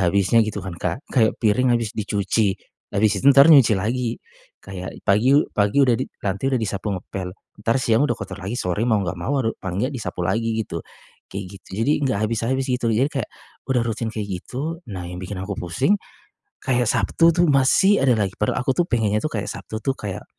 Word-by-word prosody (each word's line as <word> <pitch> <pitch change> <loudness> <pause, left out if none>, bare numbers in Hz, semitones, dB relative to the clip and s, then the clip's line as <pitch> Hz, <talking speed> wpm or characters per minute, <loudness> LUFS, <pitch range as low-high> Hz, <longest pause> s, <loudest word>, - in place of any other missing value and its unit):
habisnya 100 +4 +3
gitu 105 -3 -2
kan, 95 - -5
Kak. 135 - -3
Kayak 115 -5 +3
piring 115 +4 +2
habis 115 -2 -3
dicuci, 100 -1 0 0.4
habis 105 +1 +3
itu 140 - +4
entar 140 0 +8
nyuci 130 -7 +6
lagi. 115 +4 -1 0.5
Kayak 95 -1 -7
pagi 115 +8 +4
u 150 - +4
pagi 105 +7 +3
udah 125 - +3
di - - -3 0.2
nanti 100 +6 -1
udah 135 - +1
disapu 105 -2 -3
ngepel, 90 0 -6 0.3
entar 115 +3 +1
siang 125 +2 +2
udah 120 - 0
kotor 95 0 -7
lagi, 100 +6 -4
sore 90 -1 -2
mau 110 - +4
enggak 90 0 -4
mau 140 +11 -1
haru 115 -4 0
paling 95 +4 -2
nggak 135 - -2
disapu 110 -8 -4
lagi 115 +3 0
gitu, 85 - -5 0.5
kayak 100 0 -5 0.2
gitu. - - -22 0.2
Jadi 145 - +3
enggak 130 -7 0
habis-habis 115 +4 -1
gitu, 125 -2 0
jadi 120 +6 +2
kayak, 135 -6 -3 0.4
udah 130 -2 +2
rutin 115 0 -2
kayak 110 -2 -5
gitu, 155 - -5
nah 95 -4 -6
yang 90 +1 -7
bikin 95 +2 -6
aku 100 - -4
pusing, 130 - +1 0.6
kayak 125 -3 +1
Sabtu 165 +8 +3
tuh 175 - +4
masih 145 +9 +4
ada 130 -3 +3
lagi. 100 -3 0
Padahal 105 +4 0
aku 135 - +2
tuh, 175 +4 0
pengennya 105 -3 +1
tuh, 155 - -2
kayak 105 -2 -3
Sabtu 110 - -7
tuh 135 - +2
kayak, 100 -3 -5
110 Hz, 205 wpm, -22 LUFS, 100-130 Hz, 0.6 s, entar